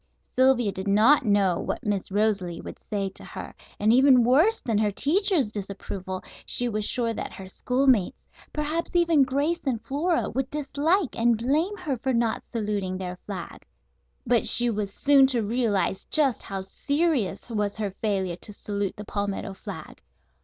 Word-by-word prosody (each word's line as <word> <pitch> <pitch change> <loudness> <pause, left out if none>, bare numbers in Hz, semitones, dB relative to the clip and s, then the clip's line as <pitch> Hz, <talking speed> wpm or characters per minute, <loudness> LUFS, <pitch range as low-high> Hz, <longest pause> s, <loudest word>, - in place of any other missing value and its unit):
Sylvia 255 -4 +3
did 190 0 -6
not 225 +8 +5
know 200 -4 +2
what - - -4
Miss 205 -3 -1
Rosalie 200 -4 0
would - - -9
say 200 -2 -3
to 190 - -12
her, - - -8 0.3
and, 215 +2 +4
even 260 -1 +6
worse 315 - +4
than 225 -4 -1
her 215 -1 +2
teacher's 315 - +1
disapproval, 195 -2 -6 0.2
she 245 - 0
was 215 -2 -2
sure 230 0 0
that - - -5
her 190 - -9
schoolmates, 250 0 +1 0.3
perhaps 310 +4 -3
even 335 -4 +4
Grace 280 +6 +1
and 255 -5 -1
Flora, 320 +5 0
would 265 0 -2
dislike 300 +3 0
and 235 0 +2
blame 305 - 0
her 305 -9 -3
for 260 +3 -1
not 230 -2 0
saluting 205 -5 -2
their 180 -1 -6
flag. 190 -4 -7 0.6
But 240 -1 +2
she 240 0 +5
was 205 -2 -3
soon 275 +4 +5
to 245 -4 0
realize 210 -4 0
just 280 -7 +3
how 195 -1 -5
serious 280 - -1
was 210 -2 -1
her 210 -2 -2
failure 190 -3 -2
to 210 - -7
salute 200 -1 -3
the 210 - -8
palmetto 200 -1 -3
flag. - - -9
230 Hz, 165 wpm, -25 LUFS, 200-275 Hz, 0.6 s, even